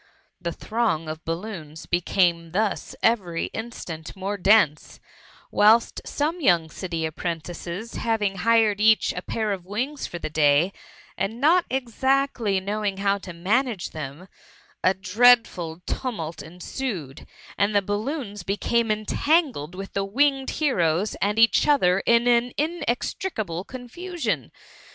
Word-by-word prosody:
The 170 -1 -2
throng 215 -5 -1
of 155 +1 -6
balloons 165 -3 -6
became 175 -1 +1
thus 210 +1 -1
every 185 -8 +1
instant 175 -9 -7
more 195 +2 -3
dense, 190 -6 +3 0.5
whilst 220 +3 +4
some 320 +4 -2
young 170 - +3
city 165 -3 -3
apprentices 170 +5 -5
having 210 -4 0
hired 220 0 +3
each 220 0 +4
a 180 - -4
pair 215 +2 -2
of 190 -3 -3
wings 255 +8 -3
for 175 - -6
the - - -4
day, 155 +4 +3 0.5
and 220 +4 -2
not 335 +6 +4
exactly 260 -4 0
knowing 200 0 -2
how 200 0 +1
to 190 - -8
manage 205 +4 0
them, 155 +4 -7 0.6
a 185 - +4
dreadful 190 -4 +3
tumult 170 - -4
ensued; 175 - -6 0.3
and 205 +1 +1
the 200 - +4
balloons 210 +1 -3
became 220 +5 0
entangled 215 - +1
with 195 +1 -7
the 200 - 0
winged 270 +6 +1
heroes 195 - +1
and 205 +2 +1
each 230 +5 +5
other 190 -11 +4
in 235 0 +5 0.3
inextri 320 +3 -2
cable 175 -5 -3
confurion. 245 - -4
205 Hz, 125 wpm, -24 LUFS, 175-235 Hz, 0.6 s, each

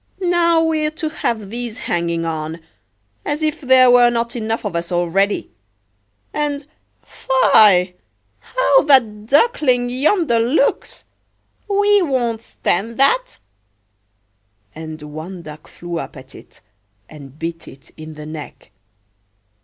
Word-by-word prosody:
now 340 -1 +3
we're 310 -1 0
to 315 0 -5
have 220 -9 -3
these 235 -1 -5
hanging 170 -1 -2
on, 160 0 -4 0.6
as 300 +2 -3
if 310 -1 -1
there 260 -1 +5
were 245 -1 +6
not 235 0 -2
enough 225 -1 -3
of 200 -4 -3
us 170 +1 -3
already! 180 +4 0 0.8
And—fie!—how 285 - +1
that 220 -7 +3
Duckling 270 - +2
yonder 280 - +1
looks; 290 - 0 0.6
we 410 0 +3
won't 245 -8 -1
stand 225 +1 -3
that!" - - +2 1.4
And 155 0 -8
one 160 +4 -8
duck 150 -1 -11
flew 175 -1 -6
up 160 - -8
at 130 +1 -13
it, - - -16 0.5
and 145 -2 -13
bit 165 0 -6
it 135 - -15
in 155 0 -10
the 150 0 -9
neck. 155 -6 -10
230 Hz, 115 wpm, -18 LUFS, -, 1.4 s, were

